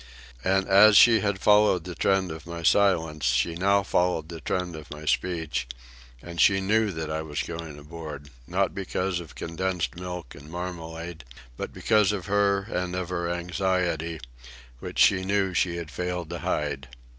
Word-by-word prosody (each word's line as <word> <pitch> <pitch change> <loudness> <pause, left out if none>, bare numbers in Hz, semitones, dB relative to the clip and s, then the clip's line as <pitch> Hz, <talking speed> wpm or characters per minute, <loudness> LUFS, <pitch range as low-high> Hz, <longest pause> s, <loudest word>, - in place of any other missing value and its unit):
And 95 +1 +2
as 100 +1 +7
she 115 -2 +7
had 100 -2 -1
followed 105 -4 +4
the 90 +1 -6
trend 95 +2 +1
of 80 0 -9
my 85 -1 -6
silence, 80 -6 +2
she 60 +7 +2
now 100 +3 +2
followed 90 -4 0
the 85 -2 -8
trend 90 0 -2
of 75 -1 -10
my 75 +1 -9
speech, 80 -5 -1 0.6
and 85 0 -3
she 100 -1 +5
knew 110 +3 +2
that 80 -4 -4
I 80 0 -2
was 75 -2 -3
going 80 -3 -7
aboard, 75 -2 -9 0.2
not 95 +2 0
because 95 -1 -2
of 85 -3 -11
condensed 90 0 -2
milk 90 -4 -7
and 70 +2 -13
marmalade, 85 -2 -6 0.3
but - - -5
because 105 -2 +2
of 100 -4 -4
her 100 -1 +2
and 90 -3 -3
of 90 -1 -3
her 85 -1 -2
anxiety, 85 -2 -1 0.6
which - - -7
she 95 -1 +5
knew 95 -1 0
she 90 -1 +1
had 85 -3 -6
failed 90 +2 -4
to 85 - -4
hide. 70 -1 -2
90 Hz, 170 wpm, -26 LUFS, 80-95 Hz, 0.6 s, as